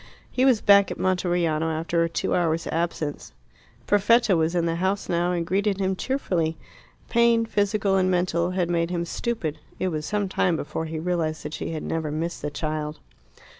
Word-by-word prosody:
He 255 - +2
was 255 -5 +4
back 200 -1 +6
at - - -5
Monteriano 175 -4 +1
after 165 +1 0
a 165 - 0
two - - -1
hours' 165 -2 +1
absence. 165 -3 -3 0.5
Perfetta 205 0 +4
was 165 +1 +1
in 170 -1 +2
the 165 0 0
house 190 +3 -1
now, 175 +1 +1
and 170 -2 -1
greeted 195 +3 0
him 190 -1 0
cheerfully. 180 - -1 0.5
Pain, 235 -1 +3
physical 205 -2 +1
and 185 -1 +2
mental, 175 -1 +1
had 180 -1 0
made 170 -1 0
him 170 -1 -2
stupid. 170 -6 -3 0.2
It 185 - -1
was 155 -2 -3
some 210 -1 0
time 180 -2 +1
before 160 +1 -4
he 160 0 -5
realized 160 -2 -1
that 150 - -6
she - - -4
had 155 - -4
never 160 -2 -2
missed 165 +3 -3
the 150 - -2
child. 150 0 -3
175 Hz, 185 wpm, -25 LUFS, 160-195 Hz, 0.5 s, back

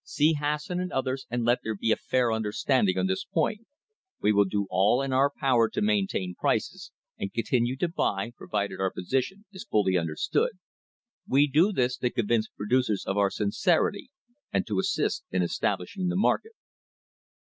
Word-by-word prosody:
See 155 +2 +2
Hasson 150 +4 -2
and 180 - -4
others 130 0 -2
and 120 0 -1
let 120 +1 +3
there 110 0 -3
be 110 +2 0
a - - +5
fair 125 -2 0
understanding 110 -1 +1
on 95 - +1
this 95 0 -1
point. 215 +7 -1 0.5
W 105 - +2
e - - -2
will 100 0 +5
do 100 +1 -1
all 100 +6 +3
in 135 -1 -2
our 135 +2 +4
power 125 -5 +2
to - - -3
maintain 195 - 0
prices, - - -2 0.3
and 100 - -3
continue 120 +2 0
to 175 - 0
buy, 115 - -1
provided 100 -4 -3
our 95 0 +1
position 135 - -2
is 190 - -8
fully 95 -3 +2
understood. 85 - 0 0.7
We 140 +2 +4
do 155 +8 +3
this 125 -8 0
to 125 - 0
convince 115 -1 0
producers 110 -1 0
of 95 - -1
our 100 -1 +3
sincerity, 170 - 0 0.4
and - - 0
to 105 -4 -1
assist - - 0
in 90 -1 0
establishing 90 - -2
the 175 - -1
market." 440 - +1
120 Hz, 175 wpm, -27 LUFS, 100-150 Hz, 0.7 s, a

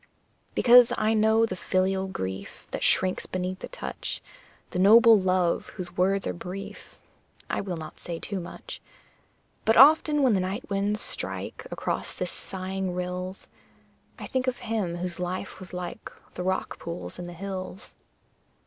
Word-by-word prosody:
Because 245 -1 +7
I 215 +1 +2
know 220 +1 +4
the 190 - -4
filial 190 +1 0
grief 95 - -6
That - - -3
shrinks 185 -1 +2
beneath 185 0 -3
the - - -6
touch - - -5 0.5
The 180 - -2
noble 225 +4 +8
love 185 -2 +1
whose 180 -1 -5
words 195 +1 +2
are - - -1
brief 180 +3 -8 0.5
I - - 0
will 185 -3 -4
not 155 -1 -9
say 170 -1 -4
too 200 +3 -3
much; 175 - -8 0.8
But 225 - +3
often 295 +2 +7
when 255 -4 +5
the 195 - +3
night 185 +2 -3
winds 200 +2 0
strike - - -4
Across - - -3
the - - -2
sighing 190 -1 -4
rills, 180 +1 -4 0.7
I - - -7
think 260 0 -1
of 255 - 0
him 215 -7 -2
whose 175 0 -4
life 185 +2 -4
was 185 -2 -8
like 180 -1 -6 0.2
The - - -5
rock 185 +1 -2
pool's 170 +1 -6
in 175 - -5
the 175 - -7
hills. 190 +1 -6
190 Hz, 160 wpm, -27 LUFS, 180-215 Hz, 0.8 s, noble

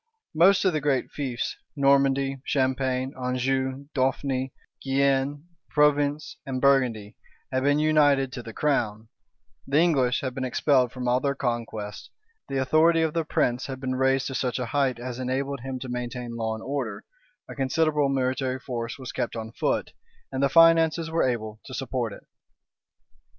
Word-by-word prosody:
Most 185 +5 +5
of 185 - +3
the 155 - 0
great 135 -2 0
fiefs, 130 -5 -3 0.2
Normandy, 135 -1 +2
Champagne, 130 -1 0
Anjou, 130 +2 -1
Dauphny, 130 0 0 0.3
Guienne, 140 +1 +1 0.3
Provence, 145 0 +2
and 135 -3 -3
Burgundy, 125 -6 +2 0.4
had 130 0 0
been 145 +2 +3
united 145 -3 +3
to 125 - -5
the 115 - -9
crown; 110 -5 -1 0.6
the 140 +2 +1
English 140 -7 +3
had 130 -2 -3
been 130 - -4
expelled 130 0 +2
from 125 -1 -5
all 125 +1 +3
their 140 +1 -1
conquests; 115 -5 -4 0.4
the 135 - -2
authority 160 +5 +4
of 160 -2 0
the 165 - 0
prince 125 -5 0
had 130 -1 -6
been 130 -1 -2
raised 135 +1 +2
to 135 - -4
such 125 -2 -1
a 125 - -2
height 135 0 0
as 120 +1 -6
enabled 135 +2 -2
him 130 +1 -5
to 130 - -7
maintain 125 -1 -5
law 110 -1 -2
and 110 - -9
order; 130 -6 -3 0.4
a - - -8
considerable 150 +1 +1
military 130 -1 0
force 120 -3 -5
was 130 -3 -7
kept 120 - -3
on 110 -1 -5
foot, - - -1 0.4
and 130 - -2
the 140 - +3
finances 165 +1 +5
were 165 -5 +2
able 110 -3 -4
to 130 - -8
support 125 -3 -2
it. - - -11
130 Hz, 165 wpm, -26 LUFS, 125-140 Hz, 0.6 s, Most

